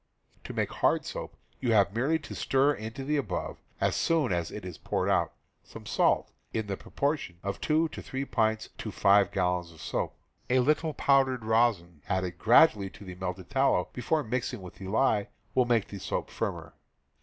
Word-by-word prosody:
To - - -6
make - - -1
hard - - +1
soap, - - -6 0.2
you 120 -3 +1
have 100 -2 +4
merely 135 +8 +2
to 155 - -9
stir 135 +2 +2
into 110 +2 -6
the 150 +2 0
above, 140 - -3 0.2
as - - +1
soon 155 - +2
as 85 -1 -1
it 105 -3 -7
is 90 -3 -7
poured - - -1
out, - - +2 0.3
some - - -12
salt, - - +2 0.2
in 110 - 0
the 100 -1 -3
proportion 140 - -2
of 100 0 -4
two 155 +1 +2
or 160 - -6
three 135 +1 -4
pints 110 -3 0
to - - -4
five 100 -1 +4
gallons 90 -3 0
of 80 - -16
soap. - - -3 0.3
A 125 - +4
little 150 +4 +2
powdered 135 -4 +3
rosin 110 -8 +1
added 90 -2 -1
gradually 110 -4 +5
to 100 - -13
the 90 - -7
melted 90 0 -5
tallow, 135 +1 +2
before 150 +5 0
mixing 125 -2 -3
with 90 - -9
the 95 - -8
lye, 105 0 +2 0.3
will 125 - +4
make 115 -4 +1
the 100 - -7
soap - - -3
firmer. - - -4
110 Hz, 190 wpm, -29 LUFS, 95-135 Hz, 0.3 s, gradually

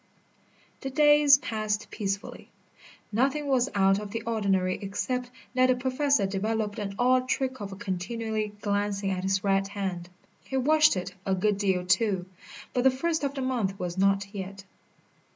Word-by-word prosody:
The 270 - -4
days 295 0 +6
passed 215 -4 -3
peacefully. 200 -2 -4 0.6
Nothing 275 +7 +1
was 265 -2 +2
out 195 0 +4
of 210 -1 -7
the 225 +1 -4
ordinary 195 -5 0
except 245 +5 -3 0.2
that 255 0 +4
the 255 - +3
Professor 260 -2 +1
developed 210 +2 -2
an 200 -1 -4
odd 255 +1 +2
trick 260 -2 -1
of 195 -1 -6
continually 215 +3 -3
glancing 205 -1 -1
at 185 -1 -2
his 190 0 0
right 195 -1 +2
hand. 190 -4 -4 0.3
He 265 - -3
washed 305 -1 +4
it 185 +1 -4
a 190 0 0
good 200 +2 +1
deal, 190 -3 +1
too. 190 -1 +1 0.5
But 250 - +1
the 265 - +7
first 315 +4 -1
of 280 0 -1
the 270 - -3
month 225 -7 -1
was 175 -1 -3
not 195 +1 +2
yet. 195 0 -7
210 Hz, 160 wpm, -27 LUFS, 195-255 Hz, 0.6 s, the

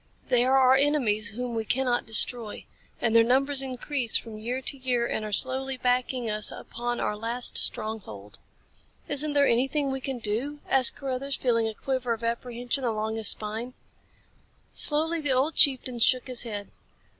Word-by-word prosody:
They 245 -1 +3
are 265 +1 +3
our 260 -1 +5
enemies 265 -7 +1
whom 245 0 -5
we 225 -1 -2
cannot 245 +1 0
destroy. 225 0 +5 0.3
And 230 -1 0
their 230 - +7
numbers 270 +3 +1
increase 260 -1 -3
from 220 -2 -9
year 240 +4 -4
to 265 - -4
year 250 -3 -1
and 220 - -3
are 215 - -6
slowly 260 +4 -1
backing 250 -1 -1
us 215 -1 0
upon 240 +1 -6
our 210 - -2
last 230 +3 -1
stronghold." 110 - 0 0.7
"Isn't 290 +1 +2
there 285 -1 +3
anything 270 +3 0
we 265 0 -4
can 265 0 -4
do?" 240 +7 -3
asked 260 -2 +2
Carruthers, 275 0 -4
feeling 230 -3 0
a 220 - -6
quiver 255 -2 -3
of 230 0 -8
apprehension 245 +2 -3
along 220 -2 -2
his 220 -2 -1
spine. 220 +4 -1 1.0
Slowly, 320 +2 +2
the 290 -3 0
old 270 +5 0
chieftain 255 -4 +3
shook 255 +2 +3
his 255 -2 0
head. 205 -4 -5
245 Hz, 170 wpm, -26 LUFS, 225-265 Hz, 1.0 s, their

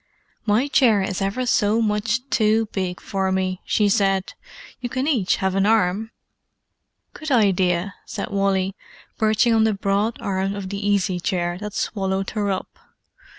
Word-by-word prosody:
"My 220 +7 +3
chair 230 -8 +4
is 190 0 -3
ever 200 +6 -1
so 215 -2 +2
much 220 +3 0
too 220 0 +2
big 185 -2 -3
for 190 -1 -2
me," 185 -1 -1
she 210 - +2
said. 195 -2 +1 0.5
"You 245 - -4
can 260 +3 -2
each 235 -12 +2
have 190 -1 -1
an 195 +1 +2
arm." 215 0 +2 1.0
"Good 310 - -7
idea!" 190 -6 +2
said - - -5
Wally, 195 -1 0 0.4
perching 220 +2 +3
on 220 -1 +4
the 220 -2 +2
broad 200 +3 0
arm 195 0 -2
of 195 -2 -5
the 200 +1 -4
easy 190 -3 +1
chair 175 -3 -2
that 210 0 -6
swallowed 195 -3 -2
her 210 -2 -1
up. 190 -1 -4
200 Hz, 155 wpm, -22 LUFS, 190-220 Hz, 1.0 s, chair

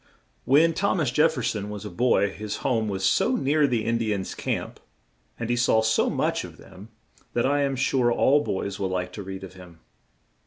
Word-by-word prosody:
When 160 +5 +4
Thom 190 +2 0
as 140 -7 0
Jef 155 +5 +3
fer - - -4
son 105 -1 -2
was 105 -2 -7
a - - -5
boy 100 0 +2
his 105 +1 -5
home 110 -4 +1
was 95 -1 -2
so 175 - +2
near 150 - +2
the 120 -4 -1
In 115 0 0
di 110 -2 -1
ans' 95 -1 -5
camp - - -4 0.6
and 115 - -3
he 120 - +1
saw 115 -2 +3
so 110 0 +2
much - - -1
of - - -11
them 100 +4 -14 0.4
that 120 - +1
I 145 +2 +2
am 140 -1 0
sure 125 -1 +1
all 145 +4 +3
boys 100 -3 -3
will 95 -1 -1
like 90 -1 -3
to 105 - -6
read 95 0 -7
of 95 - -9
him. 90 -3 -14
115 Hz, 220 wpm, -25 LUFS, 100-135 Hz, 0.6 s, When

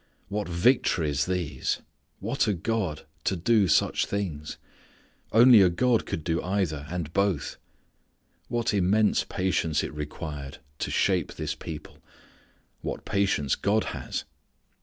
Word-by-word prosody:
What 105 -1 -3
victories 85 - +2
these! 85 -8 -2 0.4
What - - 0
a 105 - +2
God 90 -4 -2 0.2
to 95 - +1
do 100 +3 +3
such 80 - +2
things! 85 -7 -4 0.7
Only 115 -1 +8
a 95 - +6
God 120 +6 +1
could 80 - -3
do 80 0 0
either 90 -6 -1
and 85 -2 -4
both! 100 -6 0 0.9
What 120 -2 0
immense 105 +2 +3
patience 90 -4 0
it - - -5
required 75 -2 -6 0.2
to - - -2
shape - - +1
this 80 -1 -3
people. 75 -1 -9 0.8
What - - -5
patience 100 -9 +1
God 105 +2 +1
has. - - -4
90 Hz, 125 wpm, -27 LUFS, 75-100 Hz, 0.9 s, Only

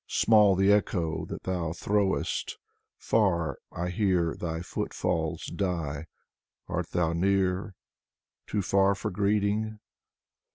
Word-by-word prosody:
Small 105 -3 +5
the 95 +2 +4
echo 90 -5 +1
that - - -7
thou 85 -3 -2
throwest, 100 +2 -1 0.4
Far, 85 -9 +1
I 90 +1 -3
hear 90 -3 +1
thy 80 -1 -4
footfalls 85 -2 -2
die. 85 -6 -3 0.6
Art - - -3
thou 85 -2 0
near? 95 +2 +1 0.4
— - - -61
too 105 -2 -1
far 100 +1 +3
for - - -4
greeting? 105 +2 0
95 Hz, 115 wpm, -28 LUFS, 85-100 Hz, 0.6 s, Small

